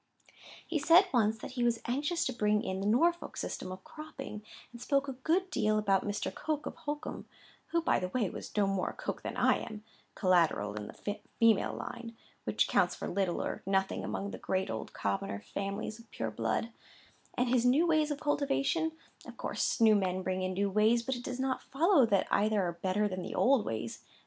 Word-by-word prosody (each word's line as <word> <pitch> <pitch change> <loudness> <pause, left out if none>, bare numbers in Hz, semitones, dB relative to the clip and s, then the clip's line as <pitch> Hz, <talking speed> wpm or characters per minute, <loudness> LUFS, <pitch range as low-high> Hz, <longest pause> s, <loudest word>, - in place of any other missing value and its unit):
"He 325 - -1
said 335 +6 +7
once 220 -2 +3
that 220 - -8
he 250 -2 -2
was 235 -1 +2
anxious 290 +7 0
to 260 - -1
bring 210 -2 +2
in 190 0 -2
the 195 - -1
Norfolk 335 +10 +2
system 185 - -4
of 185 - -8
cropping, 305 -8 -8 0.3
and 240 0 -11
spoke 280 +1 +1
a 270 - -3
good 335 +9 0
deal 215 0 +2
about 195 -3 +2
Mr. 205 -2 -2
Coke 305 -1 -2
of - - -5
Holkham 295 +1 -5 0.4
(who, 335 -1 0
by - - +3
the 180 - -2
way, 225 0 0
was - - -7
no 205 - +4
more 195 -1 0
a - - -7
Coke - - -4
than - - -5
I - - +4
am—collateral 185 - 0
in 105 0 -5
the 205 0 -5 0.2
female 225 -3 +4
line—which 230 -2 -4
counts - - +2
for - - -5
little 185 -2 0
or - - -4
nothing 195 0 +1
among 200 +1 -3
the - - -7
great 190 0 -1
old 110 - -5
commoners' 100 0 -2
families 200 +2 -3
of 230 - -16
pure 110 -1 -3
blood), 115 - -1 0.6
and 250 - +1
his 245 -1 +3
new 265 +7 +4
ways 310 -2 +3
of 290 -1 -2
cultivation; 290 +2 +1 0.3
of - - -10
course - - -1
new 225 -1 +7
men 185 -2 +1
bring 185 0 -1
in 185 0 -1
new 200 +1 +1
ways, 220 +4 +3
but 265 +1 -1
it 245 - -7
does 250 0 -4
not 260 0 0
follow 310 - +4
that 200 -3 +2
either 210 +1 +3
are 175 -1 -1
better 200 +3 +1
than 185 -2 -4
the - - -5
old 260 -3 +4
ways. 110 0 -4
220 Hz, 205 wpm, -32 LUFS, 190-275 Hz, 0.6 s, said